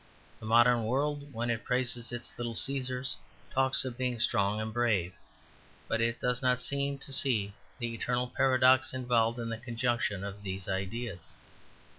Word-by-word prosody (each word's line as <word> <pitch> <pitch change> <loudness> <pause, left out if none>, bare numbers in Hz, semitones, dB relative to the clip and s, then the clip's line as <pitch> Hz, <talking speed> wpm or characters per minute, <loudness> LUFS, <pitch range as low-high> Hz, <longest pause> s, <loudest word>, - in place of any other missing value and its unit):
The 110 - -8
modern 120 0 +5
world, 145 +4 -1
when 120 0 -2
it 115 -1 -3
praises 125 -2 0
its 120 0 -5
little 120 -1 -4
Caesars, 130 +3 -1 0.3
talks 130 0 +3
of 125 -1 -5
being 125 -2 -1
strong 100 -1 +2
and 110 0 -4
brave: 105 -7 +1 0.7
but 115 - 0
it 115 0 0
does 125 +1 +1
not 125 -1 +2
seem 140 +1 -1
to 140 0 -5
see 115 -7 +1 0.2
the 120 -1 -3
eternal 125 +2 -1
paradox 130 +2 +4
involved 120 -2 +1
in 115 -1 -4
the 115 -1 -4
conjunction 120 -4 -1
of 100 0 -6
these 95 -2 -4
ideas. 95 -1 -4
120 Hz, 160 wpm, -30 LUFS, 110-130 Hz, 0.7 s, modern